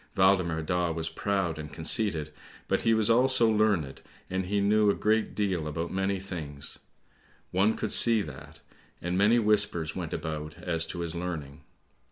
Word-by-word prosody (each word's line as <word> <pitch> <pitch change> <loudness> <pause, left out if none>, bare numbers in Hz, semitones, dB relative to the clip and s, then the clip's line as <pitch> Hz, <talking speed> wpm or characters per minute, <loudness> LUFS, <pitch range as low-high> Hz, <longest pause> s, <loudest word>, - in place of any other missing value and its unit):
Waldemar 90 -4 +3
Daa 90 +1 0
was 80 0 -3
proud 95 -6 -2
and 75 -1 -7
conceited, 80 -3 +1 0.3
but - - 0
he 115 - +2
was 110 -1 +2
also 120 0 +4
learned, 105 -10 +1 0.3
and 95 0 -2
he 100 +2 0
knew 105 +1 +3
a - - +2
great 110 +1 0
deal 95 -7 -1
about 80 +3 -4
many 95 0 -1
things. 80 -7 -6 0.7
One 100 +4 +2
could 110 - -3
see 115 -3 +5
that, 75 +1 -11 0.4
and 90 +1 -3
many 105 +5 +4
whispers 105 -8 +1
went 85 -4 -5
about 75 -1 -5
as 80 -2 0
to 85 - -5
his 85 -2 -4
learning. 80 -4 -5
90 Hz, 165 wpm, -28 LUFS, 80-105 Hz, 0.7 s, see